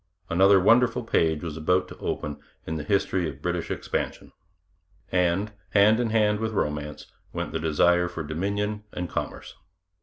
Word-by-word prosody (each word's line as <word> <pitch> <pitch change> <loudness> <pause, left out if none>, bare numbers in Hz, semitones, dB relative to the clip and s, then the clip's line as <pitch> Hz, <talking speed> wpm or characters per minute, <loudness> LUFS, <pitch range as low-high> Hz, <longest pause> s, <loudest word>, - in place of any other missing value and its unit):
Another 95 +3 +6
wonderful 120 +5 +4
page 80 -8 +1
was 80 -3 -4
about 90 +3 +1
to - - -10
open 75 -1 -3 0.3
in 80 - -3
the 75 - -3
history 95 0 +1
of 70 -2 -10
British 90 +2 -2
expansion. - - -3 0.8
And, 90 +3 +1 0.2
hand 105 +3 +6
in 120 -2 0
hand 105 -1 +2
with 110 0 -2
romance, 75 -5 -2 0.3
went - - -3
the 80 - -2
desire 85 +3 +3
for 85 -2 -5
dominion 100 +7 -2
and 90 0 -3
commerce. - - -5
90 Hz, 155 wpm, -26 LUFS, 80-105 Hz, 0.8 s, Another